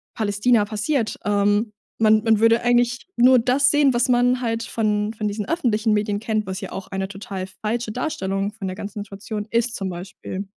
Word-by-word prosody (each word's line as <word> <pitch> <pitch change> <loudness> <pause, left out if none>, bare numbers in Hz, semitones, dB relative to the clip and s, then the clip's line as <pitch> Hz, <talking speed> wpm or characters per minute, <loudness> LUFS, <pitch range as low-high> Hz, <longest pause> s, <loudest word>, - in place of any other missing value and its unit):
Palästina 215 +2 +2
passiert. 220 +3 -1
Ähm, 205 +1 +1 0.3
man 215 0 +4
man 225 -2 +3
würde 230 +1 +4
eigentlich 245 +3 +2
nur 255 +2 +6
das 260 +3 +3
sehen, 290 -3 +4
was 240 +2 +2
man 245 +1 +3
halt 230 -1 -1
von 210 -2 -1
von 215 -1 -3
diesen 210 0 -3
öffentlichen 225 -9 +1
Medien 205 -1 0
kennt, 215 -1 -1
was 190 0 -4
ja - - -6
auch 190 - -6
eine 190 0 -3
total 195 -1 -6
falsche 215 +4 -3
Darstellung 200 -6 -2
von 205 -3 -6
der 185 - -4
ganzen 205 +1 -6
Situation 205 +1 -6
ist, 235 +1 +1
zum 195 -3 -3
Beispiel. 185 +2 -7
215 Hz, 185 wpm, -22 LUFS, 205-240 Hz, 0.3 s, nur